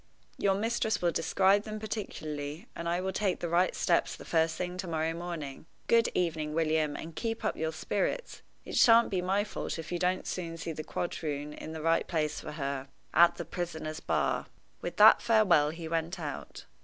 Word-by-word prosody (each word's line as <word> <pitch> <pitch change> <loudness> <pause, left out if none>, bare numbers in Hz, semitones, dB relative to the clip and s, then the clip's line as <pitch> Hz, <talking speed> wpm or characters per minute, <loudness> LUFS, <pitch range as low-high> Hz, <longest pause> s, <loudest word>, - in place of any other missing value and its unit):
"Your 195 -1 +3
mistress 220 0 0
will 175 -1 +2
describe 190 +5 +3
them 215 0 -6
particularly, 155 -8 -5
and 170 0 -3
I 175 +1 +1
will 190 +1 -2
take 195 -2 0
the 175 - -2
right 175 +2 +2
steps 170 - +1
the - - -12
first 160 -1 +2
thing 180 0 -3
to 185 0 -4
morrow 160 0 -1
morning. 165 -4 -6 0.2
Good 230 0 +4
evening, 155 -4 -1
William, 155 -2 +1
and 160 0 -7
keep 225 -1 -3
up - - 0
your 160 0 -1
spirits. - - -2 0.2
It - - -6
shan't 230 -1 +6
be 185 -2 +1
my 195 +3 +1
fault 210 - -4
if 165 +1 -7
you 175 - -1
don't 185 +1 0
soon 165 -2 -4
see 165 - -4
the 155 0 -5
quadroon 150 -3 -3
in 160 - -8
the 160 -1 -6
right 165 0 +2
place 155 -3 -1
for 155 - -7
her 140 -2 -3 0.3
at 170 +1 +6
the 170 - -5
prisoner's 160 -2 -4
bar." - - 0 0.3
With - - -5
that - - +8
farewell 210 -10 +4
he 165 +1 -6
went 165 +2 -2
out. 150 -3 -6
170 Hz, 195 wpm, -30 LUFS, 155-190 Hz, 0.3 s, that